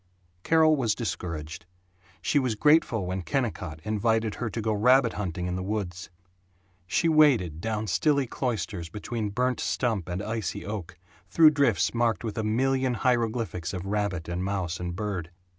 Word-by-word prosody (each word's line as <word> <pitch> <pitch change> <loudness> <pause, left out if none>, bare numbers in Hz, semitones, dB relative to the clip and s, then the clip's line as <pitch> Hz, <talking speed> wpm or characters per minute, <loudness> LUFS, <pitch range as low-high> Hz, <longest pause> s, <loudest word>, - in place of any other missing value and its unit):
Carol 160 - +4
was 120 -7 0
discouraged. 85 -8 -5 0.6
She 145 - +2
was 125 -5 0
grateful 135 - +3
when 95 +1 -3
Kennicott 100 - -2
invited 110 +1 0
her 120 - -1
to 115 - -5
go 110 0 0
rabbit 125 +3 +4
hunting 90 -3 -3
in 90 0 -2
the 95 - -3
woods. 95 -3 -4 0.8
She 165 - +1
waded 130 - +4
down 110 0 -2
stilly 135 - +2
cloisters 100 -9 -3
between 105 +3 -4
burnt 125 +4 0
stump 110 -9 -1
and 90 +3 -3
icy 110 -4 -3
oak, 100 -5 -6 0.3
through 160 -2 +7
drifts 140 -8 +2
marked 115 -1 +1
with 110 -1 -3
a - - -1
million 130 +3 +1
hieroglyphics 115 -7 -1
of 90 0 -5
rabbit 100 -4 -2
and 85 +1 -3
mouse 95 -3 -2
and 90 -1 -4
bird. 95 -5 -3
110 Hz, 160 wpm, -27 LUFS, 90-125 Hz, 0.8 s, through